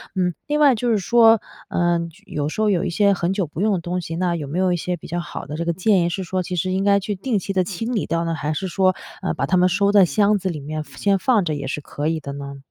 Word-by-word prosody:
嗯， 180 -2 +1
另 300 +1 0
外 285 -3 +6
就 240 +2 -1
是 220 - +3
说， 225 +3 +5 0.3
嗯， 170 -1 0 0.2
有 150 -4 -3
时 215 - -3
候 215 - +3
有 180 - +1
一 - - -1
些 200 +3 +3
很 180 0 -1
久 195 -3 0
不 155 - -8
用 210 -1 +2
的 185 - 0
东 175 +2 -2
西， 165 -1 -5
那 175 0 0
有 150 -4 -4
没 165 +6 -3
有 185 -1 +2
一 175 - +1
些 180 +2 -2
比 160 - -11
较 175 +1 -2
好 175 - -6
的 150 - -6
这 170 - -2
个 170 - 0
建 190 +1 +2
议 170 - +1
是 190 +2 -3
说 185 +1 -2
其 180 - -4
实 185 +2 -1
应 190 +1 0
该 200 0 +4
去 205 +1 -3
定 215 +2 -1
期 195 - -5
地 185 -1 +2
清 210 +7 -4
理 205 - 0
掉 165 +1 -1
呢， 165 0 -1
还 155 0 -2
是 190 +5 -3
说， 185 0 +2 0.3
嗯， 190 - -2
把 135 - -1
它 185 +6 +2
们 180 0 +5
收 200 +2 +2
在 200 -2 +6
箱 205 +6 +2
子 190 0 -2
里 155 -3 -4
面 155 +2 -5
先 200 +5 0
放 230 -2 +3
着 160 -3 -1
也 140 -1 -5
是 145 +3 -3
可 145 +1 -4
以 160 0 0
的 140 -2 -7
呢？ 140 0 -7
180 Hz, 330 characters per minute, -21 LUFS, 165-200 Hz, 0.3 s, 外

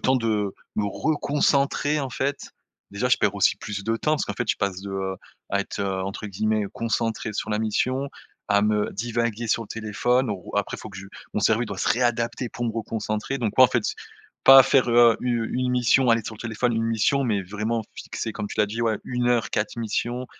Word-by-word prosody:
temps 130 0 +3
de 105 -4 -1 0.2
me 105 - +1
reconcentrer, 145 +2 +1
en 135 - -3
fait, 140 +3 -3 0.4
déjà, 105 +6 -1
je 130 - +5
perds 100 - +1
aussi 100 - +4
plus 100 -2 -6
de 115 +1 0
temps 150 +6 0
parce 155 - +1
qu'en - - -4
fait, 120 -3 -4
je - - -1
passe 95 -2 -2
de, 100 - -7
heu, 95 -1 -3 0.3
à 100 0 +1
être, - - -5
entre 95 +2 -3
guillemets, 110 +2 0
«concentré 115 -1 -2
sur 105 - -4
la 105 - 0
mission», 130 +5 0 0.4
à 100 0 +3
me 105 0 +1
divaguer 115 +1 -2
sur 115 +1 +1
le 105 - -13
téléphone 115 +4 0
où 100 -4 -5
après 100 - -1
faut - - -9
que 100 -2 -10
je 95 - -9 0.3
mon - - +1
cerveau 110 +3 +3
doit 100 -4 -6
se - - 0
réadapter 120 0 0
pour 120 - -5
me 115 - -1
reconcentrer 110 +2 -3
donc 110 -4 -2
ouais, 130 - +8
en 125 - +8
fait, - - 0 0.6
pas 135 0 +10
faire, 130 -1 +3
heu, 120 -1 +6
u 120 -2 -1
une 125 0 0
mission, 125 0 +3
aller 115 0 +3
sur 110 - -6
le 110 - -14
téléphone, 120 +1 -1
1 115 - 0
mission 115 +5 +2
mais 105 -6 0
vraiment 105 +4 -2
fixer, 110 - -5
comme 105 -1 -5
tu - - -8
l'as 105 - +4
dit, 115 +3 -3
ouais, 110 -3 +1
1 125 -1 -1
heure 120 -2 +1
4 105 +1 -2
missions, 120 +2 -2
115 Hz, 220 wpm, -24 LUFS, 105-125 Hz, 0.6 s, pas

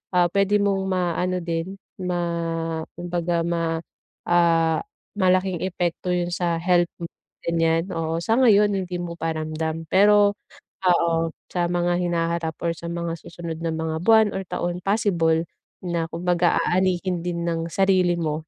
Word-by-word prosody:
ah, 180 -1 +5
pwede 200 +1 +3
mong 195 -1 0
maano 180 0 0
din 170 +3 -3 0.3
ma 180 -1 -1 0.8
kumbaga 175 -1 -1
ma 165 -1 -1 0.5
ah, 165 -2 +3 0.4
malaking 185 -2 +2
epekto 175 -1 -2
yun 175 0 -1
sa 175 -1 0
health 175 0 +3
mo - - -2 0.4
ganyan, 165 +1 +1
oo. 165 0 -2
Sa 225 +6 +2
ngayon 210 -5 +5
hindi 185 -2 -3
mo 170 -1 -5
pa 165 0 -1
ramdam 160 +1 -3
pero 205 +1 +5 0.5
oo, 170 -2 +3 0.4
sa 175 -1 0
mga 175 0 +1
hinaharap 170 -2 -1
or 170 - +1
sa 170 +1 -8
mga 170 0 -3
susunod 165 -2 -7
na 165 -1 -1
mga 160 0 -2
buwan 220 -2 +5
or 190 - -2
taon 175 0 -3
possible 175 -6 +2 0.4
na 170 -2 -1
kumbaga 175 +1 +1
aanihin 185 0 +1
din 175 -1 -2
ng 165 -1 -1
sarili 185 -1 +3
mo, 155 -1 -3
175 Hz, 145 wpm, -23 LUFS, 165-185 Hz, 0.8 s, ah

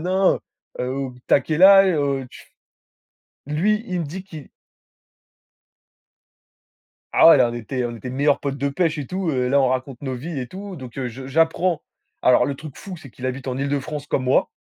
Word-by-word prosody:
nin. 185 +3 +2 0.4
Heu, 125 - -1
heu, 130 +1 -3 0.2
«Tu - - +5
as - - +5
quel 155 +5 -1
âge?» 195 -1 +8
heu, 140 -2 0
tu - - -13
f - - -24 1.0
lui, 210 +9 +1
il 180 -1 -2
me - - -2
dit 185 +6 -7
qu'il 160 -7 -11 2.6
Ah - - +7
ouais! - - +9
Là, 125 -3 +4
on - - -6
était 120 +2 -3
on 120 -1 -4
était 125 - -8
meilleurs 140 +3 +2
potes 140 -1 -3
de 140 +1 -1
pêche 165 +3 0
et 140 - -4
tout, 185 -2 -2
heu, 125 -3 0
là, 140 +2 +3
on 130 - +3
raconte 130 0 -3
nos 130 -2 -4
vies 145 +5 -5
et 125 - -4
tout, 195 +4 -8
donc 130 -5 -10
heu, 130 -2 -2
je 130 +3 -9
j'apprends 165 +3 +1 0.4
alors 125 -1 +5
le 140 - -2
truc 150 0 -10
fou, 190 -2 -8
c'est 145 -5 -13
qu'il 125 - -11
habite 130 +1 -4
en 125 - -2
Île-de-France 140 +1 -3
comme 135 - -1
moi. 130 - +3
140 Hz, 210 wpm, -22 LUFS, 130-165 Hz, 2.6 s, ouais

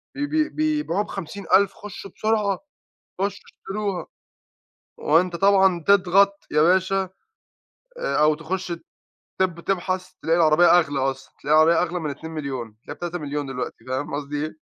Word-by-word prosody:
بي 290 0 -1
بي 310 0 +1
بيبيعوها 300 - 0
ب50.000، 195 +1 0
خُشوا 200 -2 -9
بسرعة، 215 -3 +1 0.6
خُشوا 200 0 -1
اشتَروها. 200 -2 -4 0.9
وأنتَ 170 +3 +2
طبعًا 190 -2 +4
تضغَط 200 +1 +4
يا 150 - +3
باشا، 190 +2 +2 0.9
آآ، - - -1
أو 150 0 +4
تخُش 175 +3 -4 0.7
تب 180 -3 +1
تبحَث، 185 0 -2
تلاقي 165 +1 +2
العربية 170 +2 +6
أغلى 145 -4 -1
أصلًا، 135 0 -3
تلاقِي 150 +3 +1
العربية 165 +2 +5
أغلى 180 0 -1
من 155 -2 -3
2.000.000، 140 -7 -6
تلاقِيها - - -6
ب3.000.000 150 -5 -4
دلوقتي، 125 -3 -6
فاهم 130 +2 -3
قصدي 145 +1 -3
إيه 155 0 -10
175 Hz, 135 wpm, -23 LUFS, 155-195 Hz, 0.9 s, العربية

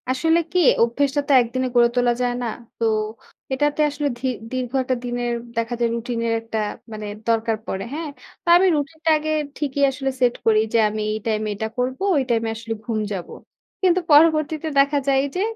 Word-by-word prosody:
আসলে 320 +6 +2
কি 365 - +2 0.2
অভ্যেসটা 280 +5 +1
তো - - 0
একদিনে 255 +2 -2
গড়ে 240 -1 +6
তোলা 245 -1 +3
যায় 245 -1 +1
না। - - -1 0.3
তো 230 - 0 0.7
এটাতে 295 +3 +1
আসলে 290 0 -2
ধি 260 +2 -3 0.2
দীর্ঘ 255 -2 -3
একটা 255 0 0
দিনের 240 0 -2 0.2
দেখা 230 +1 -1
যায় 235 -1 +2
রুটিন 235 0 -3
এর 230 - +1
একটা 225 0 -5 0.4
মানে 215 -1 -6 0.2
দরকার 225 0 +1
পড়ে। 190 0 -3
হ্যাঁ? 315 0 -4 0.3
তো - - -27
আমি 380 +2 +4
রুটিনটা 315 +3 -2
আগে 310 +1 -3 0.3
ঠিকই 285 -1 -2
আসলে 270 0 -3
সেট 245 -1 +3
করি 220 -1 +5
যে, - - +4
আমি 215 +1 -4
এই - - -2
টাইমে 215 -1 -1
এটা 220 +2 -3
করবো, 255 +6 -2
ওই 280 - +2
টাইমে 230 -1 +1
আসলে 225 0 -5
ঘুম 225 -3 -1
যাবো। 180 -3 -6 0.5
কিন্তু 370 -1 +4
পরবর্তীতে 310 +1 +4
দেখা 280 +1 +3
যায় 270 -1 +4
যে, 365 - 0
255 Hz, 190 wpm, -22 LUFS, 230-295 Hz, 0.7 s, গড়ে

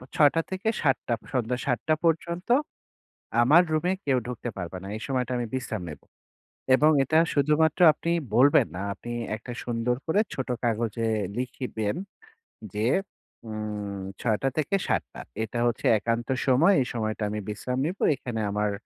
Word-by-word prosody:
৬ঃ০০-৭টঃ০০, 165 - +1 0.2
সন্ধ্যা 125 0 0
৭ঃ০০ 135 +5 +1
পর্যন্ত 170 +3 0 0.9
আমার 155 +9 +7
রুমে 170 +4 +1
কেউ 130 -2 +3
ঢুকতে 120 0 -5
পারবা 90 0 -5
না। - - -8
এই 110 - -7
সময়টা 130 -2 -1
আমি 120 - -2
বিশ্রায় 120 -7 -3
নেবো। 75 - -10 0.7
এবং 150 +3 +5
এটা 155 +4 +3 0.2
শুধুমাত্র 150 +3 +2
আপনি 165 +3 -4 0.2
বলবেন 135 +4 +6
না, 95 - -3
আপনি 120 +2 -8 0.2
একটা 115 +3 -8
সুন্দর 120 +1 0
করে 195 +6 +2
ছোট 130 - -4 0.2
কাগজে 115 -1 0 0.3
লিখিবেন 120 -4 -3 0.8
যে, 105 +2 0 0.6
উম 105 -2 -4 0.2
৬ঃ০০-৭টঃ০০ 135 - -1 0.2
এটা 115 +2 -4
হচ্ছে 120 - -2
একান্ত 115 +2 -1 0.2
সময়। 145 +10 +5
এই 125 - -1
সময়টা 110 -2 -2
আমি 105 +1 -3
বিশ্রাম 125 +4 -3
নিবো। 180 +4 -3
এখানে 120 -4 -4
আমার 105 0 0
125 Hz, 135 wpm, -26 LUFS, 110-150 Hz, 0.9 s, আমার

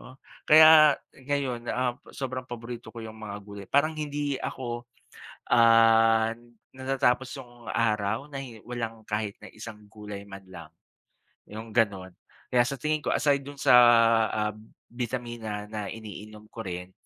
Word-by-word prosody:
"Oh." 130 - -14 0.3
Kaya 155 -1 +8 0.2
ngayon, 130 -3 -3
um, 125 -1 0 0.2
sobrang 130 -1 -5
paborito 120 0 -8
ko 115 - -8
'yung 110 0 -9
mga 105 -2 -7
gulay. 100 -1 -10
Parang 145 +3 +2
hindi 145 -2 -2
ako, 120 -2 -5 0.7
ah, 115 -1 +5 0.4
natatapos 130 -1 0
'yung 120 -2 -13
araw 110 +4 -1
na 140 - -6
hin 115 -5 -11
walang 115 -2 -5
kahit 105 -1 -2
na - - -11
isang 110 0 -10
gulay 105 -1 -9
man 95 0 -10
lang, 85 -4 -11 0.8
'yung 110 +2 -9
ganon. 100 -5 +1 0.4
Kaya 125 -1 +4
sa 140 +2 -4
tingin 155 +1 -1
ko - - -1
aside 140 -2 +2
dun 140 0 -10
sa - - +5 0.6
ah, 105 -1 -1 0.4
bitamina 120 -3 -5
na 105 -2 -5
iniinom 105 0 -10
ko 115 - -7
rin 90 0 -6
115 Hz, 145 wpm, -27 LUFS, 105-130 Hz, 0.8 s, Kaya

